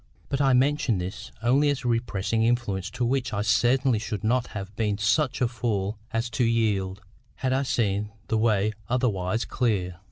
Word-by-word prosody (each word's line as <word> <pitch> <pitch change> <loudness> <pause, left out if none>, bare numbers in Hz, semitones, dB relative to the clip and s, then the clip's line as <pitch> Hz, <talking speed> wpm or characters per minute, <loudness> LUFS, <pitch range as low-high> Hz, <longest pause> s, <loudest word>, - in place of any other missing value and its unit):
But 140 0 0
I 135 -2 +4
mention 130 -3 +2
this 95 +6 -6
only 135 +5 +4
as 140 -2 -2
a - - +1
repressing 115 -2 0
influence, 115 -5 0
to 125 - -2
which 125 -1 0
I 100 0 0
certainly 120 +3 +3
should 105 -1 -4
not 120 +2 +1
have 100 0 -7
been 105 -2 0
such 125 +8 +1
a 125 - +4
fool 110 -4 -2
as 115 +1 -1
to 120 - 0
yield, 105 -4 0 0.3
had 130 -1 -1
I 135 - +2
seen 105 -5 0 0.2
the 110 - +1
way 110 -2 +2 0.2
otherwise 110 -4 0
clear. 95 -8 -1
115 Hz, 180 wpm, -26 LUFS, 100-125 Hz, 0.3 s, I